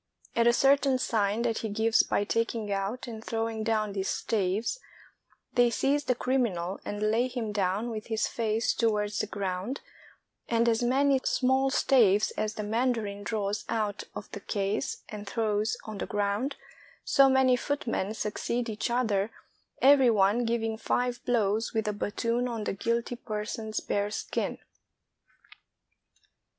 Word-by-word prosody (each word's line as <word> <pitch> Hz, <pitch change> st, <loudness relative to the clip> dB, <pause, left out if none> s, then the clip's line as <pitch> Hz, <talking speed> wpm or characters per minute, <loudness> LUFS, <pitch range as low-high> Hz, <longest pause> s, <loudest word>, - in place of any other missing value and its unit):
At 235 Hz, 0 st, +4 dB
a -, -, +7 dB
certain 275 Hz, +1 st, +4 dB
sign 220 Hz, -2 st, 0 dB
that 230 Hz, -2 st, 0 dB
he 220 Hz, -, -3 dB
gives 220 Hz, +2 st, +3 dB
by -, -, 0 dB
taking 225 Hz, 0 st, -1 dB
out 200 Hz, +7 st, -2 dB
and 225 Hz, -3 st, -8 dB
throw 225 Hz, 0 st, -1 dB
ing 220 Hz, -1 st, -4 dB
down 215 Hz, -2 st, 0 dB
these 195 Hz, -1 st, -2 dB
staves, 210 Hz, -, -1 dB, 0.7 s
they 245 Hz, -1 st, +5 dB
seize 280 Hz, +5 st, +1 dB
the 250 Hz, -, +2 dB
criminal 215 Hz, -9 st, -1 dB
and 205 Hz, +1 st, -4 dB
lay 235 Hz, +3 st, +2 dB
him 240 Hz, -4 st, -4 dB
down 205 Hz, +3 st, 0 dB
with 215 Hz, -1 st, -6 dB
his 220 Hz, -2 st, 0 dB
face 225 Hz, -1 st, 0 dB
towards 210 Hz, -2 st, 0 dB
the -, -, -1 dB
ground, 195 Hz, +5 st, -3 dB, 0.7 s
and 235 Hz, 0 st, +2 dB
as 225 Hz, 0 st, +2 dB
many 265 Hz, +2 st, +3 dB
small 265 Hz, +1 st, +2 dB
staves 220 Hz, -7 st, +4 dB
as 215 Hz, 0 st, -3 dB
the 210 Hz, -, -3 dB
mandarin 220 Hz, -2 st, -1 dB
draws 205 Hz, 0 st, -2 dB
out 215 Hz, -3 st, -1 dB
of -, -, -6 dB
the -, -, -6 dB
case 200 Hz, +5 st, -2 dB
and 210 Hz, -2 st, -7 dB
throws 215 Hz, -1 st, 0 dB
on 215 Hz, -2 st, -7 dB
the -, -, -3 dB
ground, 205 Hz, +7 st, -1 dB, 0.5 s
so 275 Hz, 0 st, +5 dB
many 265 Hz, -1 st, +4 dB
footmen 235 Hz, -6 st, -2 dB
succeed 235 Hz, +3 st, -2 dB
each 215 Hz, +2 st, -2 dB
other, 220 Hz, -4 st, +1 dB, 0.5 s
every 270 Hz, -2 st, +7 dB
one 215 Hz, +2 st, +3 dB
giving 225 Hz, -1 st, -1 dB
five 245 Hz, +1 st, -1 dB
blows 225 Hz, -1 st, +1 dB
with 220 Hz, -1 st, 0 dB
a 210 Hz, -, 0 dB
battoon 230 Hz, +4 st, -1 dB
on 230 Hz, -3 st, -3 dB
the -, -, -2 dB
guilty 235 Hz, +4 st, -1 dB
person's 215 Hz, -1 st, -4 dB
bare 205 Hz, 0 st, -1 dB
skin. 210 Hz, -, -3 dB
225 Hz, 155 wpm, -28 LUFS, 205-245 Hz, 0.7 s, a